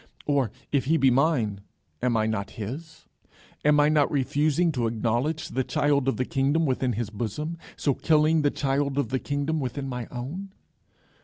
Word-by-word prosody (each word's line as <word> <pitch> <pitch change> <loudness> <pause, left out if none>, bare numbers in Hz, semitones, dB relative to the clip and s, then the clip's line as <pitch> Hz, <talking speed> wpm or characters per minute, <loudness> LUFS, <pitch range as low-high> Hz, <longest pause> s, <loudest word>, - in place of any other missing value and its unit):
Or, 140 -5 +2 0.2
if 140 -3 +1
he 160 +4 +3
be 135 -4 +4
mine, 125 -8 +1 0.4
am 125 -1 +1
not 110 -2 0
I - - -16
his? 140 +10 -7 0.6
Am 150 0 +5
I 145 - +5
not 150 -1 +3
refusing 150 +4 +2
to 120 -5 0
acknowledge 120 +7 -1
the 130 - -1
child 140 0 +1
of 135 - +1
the 130 - 0
kingdom 145 +3 +1
within 130 -2 0
his 110 -1 -3
bosom, 135 - -4 0.2
so 140 - +1
killing 155 +2 +3
the 145 - +3
child 140 0 -1
of 140 -6 0
the 130 - 0
kingdom 145 +3 -1
within 135 +1 -3
my 125 -3 -4
own?" 165 +11 -6
140 Hz, 175 wpm, -26 LUFS, 125-150 Hz, 0.6 s, Am